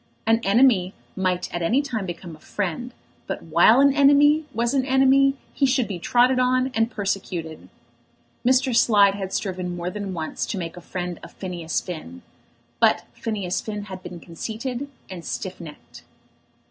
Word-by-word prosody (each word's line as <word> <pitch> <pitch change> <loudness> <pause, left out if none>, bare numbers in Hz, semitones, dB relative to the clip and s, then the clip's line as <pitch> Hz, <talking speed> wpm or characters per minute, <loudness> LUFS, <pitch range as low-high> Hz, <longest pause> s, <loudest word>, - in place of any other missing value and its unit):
An 225 +1 +4
enemy 200 -3 +3 0.2
might 185 -2 -1
at 175 - -2
any 225 +11 +2
time 225 -8 -3
become 170 -1 -7
a - - -19
friend, 205 +8 -4 0.4
but - - -4
while 235 +4 +5
an 280 -1 +5
enemy 290 +2 +5
was 235 +2 0
an 270 -2 +2
enemy 270 +1 +4 0.2
he 275 - +2
should 255 -2 +1
be 190 -4 -5
trodden 250 +7 +3
on 255 +1 +2
and 225 0 +1
persecuted. 185 -7 -4 0.7
Mr. 255 0 +3
Slide 205 -4 +5
had 195 -2 -5
striven 180 -3 -3
more 175 +1 -4
than 200 -2 -5
once 160 -2 -3
to 205 - -3
make 170 -2 -5
a 175 - -10
friend 175 0 -5
of 170 - -12
Phineas 175 -4 -3
Finn; 120 - -8 0.6
but - - +3
Phineas 200 -5 -3
Finn 210 -1 -5
had 190 -2 -8
been 175 - -8
conceited 235 - -5 0.2
and 180 -3 -8
stiff 185 +1 -5
necked. 155 -3 -12
205 Hz, 165 wpm, -23 LUFS, 180-255 Hz, 0.7 s, while